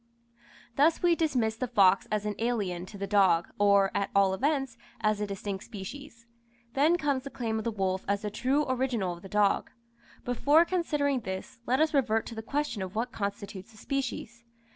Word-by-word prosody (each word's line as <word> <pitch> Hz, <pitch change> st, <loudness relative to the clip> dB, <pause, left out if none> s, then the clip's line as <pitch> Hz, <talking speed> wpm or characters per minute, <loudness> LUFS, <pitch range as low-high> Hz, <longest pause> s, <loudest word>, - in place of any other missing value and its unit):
Thus 310 Hz, +5 st, +3 dB
we 350 Hz, -1 st, +5 dB
dismiss 250 Hz, -9 st, 0 dB
the 255 Hz, -, -2 dB
fox 195 Hz, -5 st, +4 dB
as 210 Hz, -1 st, 0 dB
an 210 Hz, -, -1 dB
alien 200 Hz, -7 st, -1 dB
to 200 Hz, -, -10 dB
the 200 Hz, -, -3 dB
dog, 190 Hz, -5 st, +3 dB
or, 200 Hz, -1 st, +4 dB
at 200 Hz, -, -1 dB
all 195 Hz, -1 st, +4 dB
events, 270 Hz, +2 st, 0 dB, 0.2 s
as 215 Hz, -1 st, +1 dB
a 210 Hz, -, -1 dB
distinct 195 Hz, 0 st, -5 dB
species. 230 Hz, +3 st, -9 dB, 0.5 s
Then 305 Hz, +5 st, +4 dB
comes 285 Hz, -5 st, 0 dB
the 275 Hz, -, -6 dB
claim 225 Hz, -4 st, -2 dB
of 220 Hz, -, -6 dB
the 230 Hz, -, 0 dB
wolf 190 Hz, -2 st, -1 dB
as 200 Hz, +1 st, 0 dB
the 210 Hz, -, -3 dB
true 265 Hz, +7 st, +1 dB
original 250 Hz, -8 st, 0 dB
of 170 Hz, -, -11 dB
the 195 Hz, -, -11 dB
dog. 205 Hz, 0 st, +2 dB, 0.6 s
Before 290 Hz, +7 st, +4 dB
considering 295 Hz, -6 st, 0 dB
this, 190 Hz, +1 st, -6 dB
let 255 Hz, +2 st, +2 dB
us 315 Hz, 0 st, +2 dB
revert 235 Hz, -6 st, +2 dB
to -, -, -7 dB
the 220 Hz, -, -5 dB
question 280 Hz, -3 st, -2 dB
of 190 Hz, +2 st, -5 dB
what 230 Hz, +3 st, -1 dB
constitutes 200 Hz, +1 st, -5 dB
a -, -, -16 dB
species. 240 Hz, -2 st, -4 dB
225 Hz, 190 wpm, -29 LUFS, 200-270 Hz, 0.6 s, we